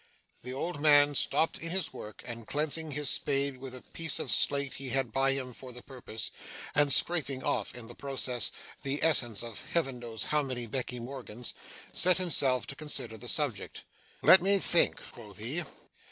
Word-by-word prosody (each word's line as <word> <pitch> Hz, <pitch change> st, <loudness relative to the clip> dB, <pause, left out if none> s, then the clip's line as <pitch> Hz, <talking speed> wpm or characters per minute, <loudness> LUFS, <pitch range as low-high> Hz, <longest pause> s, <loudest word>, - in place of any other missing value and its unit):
The 125 Hz, -, -5 dB
old 145 Hz, +3 st, -4 dB
man 145 Hz, -1 st, +6 dB
stopped 160 Hz, +3 st, +1 dB
in 165 Hz, -, -5 dB
his 185 Hz, +2 st, -2 dB
work, 105 Hz, -2 st, -10 dB
and 115 Hz, -2 st, -7 dB
cleansing 155 Hz, +2 st, -1 dB
his 145 Hz, 0 st, -2 dB
spade 140 Hz, 0 st, +1 dB
with 130 Hz, 0 st, -7 dB
a 130 Hz, -, -9 dB
piece 165 Hz, -3 st, -3 dB
of -, -, -2 dB
slate 140 Hz, -1 st, +4 dB
he 135 Hz, -1 st, -6 dB
had 135 Hz, -2 st, 0 dB
by 135 Hz, +2 st, +3 dB
him 130 Hz, -2 st, -4 dB
for 130 Hz, +1 st, -9 dB
the 125 Hz, 0 st, -9 dB
purpose 125 Hz, -4 st, -6 dB, 0.4 s
and 145 Hz, -1 st, +4 dB
scraping 140 Hz, -4 st, +3 dB
off, 110 Hz, -, -1 dB
in 120 Hz, -2 st, -8 dB
the 120 Hz, -, -9 dB
process, 130 Hz, -2 st, -1 dB, 0.3 s
the 140 Hz, 0 st, -1 dB
essence 120 Hz, -9 st, +3 dB
of 115 Hz, -3 st, -7 dB
Heaven 135 Hz, -7 st, 0 dB
knows 115 Hz, -2 st, -5 dB
how 150 Hz, 0 st, +1 dB
many 130 Hz, -4 st, -4 dB
Becky 125 Hz, 0 st, -3 dB
Morgans 125 Hz, -2 st, -7 dB, 0.4 s
set 180 Hz, 0 st, +4 dB
himself 140 Hz, -8 st, +1 dB
to 140 Hz, -, -6 dB
consider 150 Hz, -6 st, -3 dB
the 120 Hz, +2 st, -5 dB
subject. 145 Hz, -9 st, -1 dB, 0.4 s
'Let 185 Hz, -, +8 dB
me 200 Hz, +2 st, +4 dB
think' 175 Hz, -2 st, +3 dB
quoth 105 Hz, -6 st, -12 dB
he. 125 Hz, +11 st, -1 dB
135 Hz, 180 wpm, -30 LUFS, 120-150 Hz, 0.4 s, Let